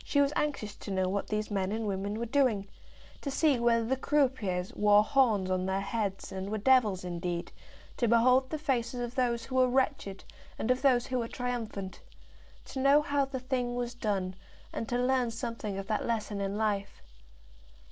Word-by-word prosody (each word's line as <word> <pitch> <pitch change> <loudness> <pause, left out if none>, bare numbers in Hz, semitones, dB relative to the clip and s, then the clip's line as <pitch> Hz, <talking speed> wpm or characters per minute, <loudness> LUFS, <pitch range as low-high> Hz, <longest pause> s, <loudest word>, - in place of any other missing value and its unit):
She 285 - +1
was 285 +1 +3
anxious 260 -9 -2
to - - -9
know 190 -1 +1
what 200 +2 -2
these 215 0 -2
men 195 -1 0
and 220 +1 -2
women 200 +1 -2
were 235 - -2
doing, 235 -6 +1 0.5
to 280 - -3
see 280 -2 +2
whether 230 -1 +3
the 260 +4 +1
croupiers 255 -11 0
wore 210 0 +5
horns 215 -7 +2
on 185 0 0
their 190 0 0
heads 200 -2 -3
and 190 +1 -4
were 215 - -1
devils 215 -5 +3
indeed, 175 -1 -3 0.5
to 240 - +1
behold 250 +3 +4
the 310 - -2
faces 255 -5 -1
of 240 0 -3
those 240 -3 0
who 260 +1 -3
were 255 -1 +5
wretched 255 -7 0 0.3
and 230 - 0
of 255 - +1
those 255 -3 +4
who 255 -1 -1
were 230 - -2
triumphant, 230 -7 -4 0.7
to 265 - -6
know 280 +3 +5
how 285 -1 +1
the 265 -1 -5
thing 250 -1 -2
was 245 0 -2
done, 195 -6 -2 0.4
and 230 - -4
to 245 - 0
learn 250 -1 +2
something 230 -3 -4
of 195 - -4
that 215 +1 -1
lesson 215 -3 -2
in 200 +1 -2
life. 200 - -2
230 Hz, 190 wpm, -30 LUFS, 200-255 Hz, 0.7 s, wore